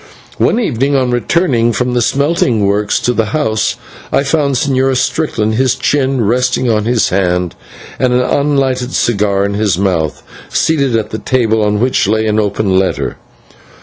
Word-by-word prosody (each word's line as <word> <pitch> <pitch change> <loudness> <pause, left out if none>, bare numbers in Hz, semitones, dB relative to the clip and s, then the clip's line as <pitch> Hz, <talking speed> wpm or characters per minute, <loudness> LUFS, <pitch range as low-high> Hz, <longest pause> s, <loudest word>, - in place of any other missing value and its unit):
One 230 - +2
evening, 140 - 0
on 130 -2 +1
returning 120 -2 +1
from 125 +4 -1
the 120 - +1
smelting 135 -5 +1
works 100 +1 0
to 125 - 0
the 115 -2 0
house, 110 -8 0 0.4
I - - +2
found 145 -1 0
the - - +1
Señor 130 0 +1
Strickland, 115 -7 -1
his 130 +2 +1
chin 135 -4 0
resting 125 +3 +1
on 105 -1 0
his 120 -1 +1
hand 90 -2 0 0.5
and 130 - +2
an 125 0 +2
unlighted 135 -2 0
cigar 100 -3 +1
in 100 - -2
his 100 -3 0
mouth, 90 -6 -1 0.3
seated 140 -6 +1
at 110 -1 -4
a 110 - -3
table, 110 -2 +1
on 105 0 0
which 125 -4 +1
lay 110 +1 +1
an 110 0 +1
open 100 -2 +1
letter. 95 - -2
120 Hz, 170 wpm, -14 LUFS, 105-130 Hz, 0.5 s, One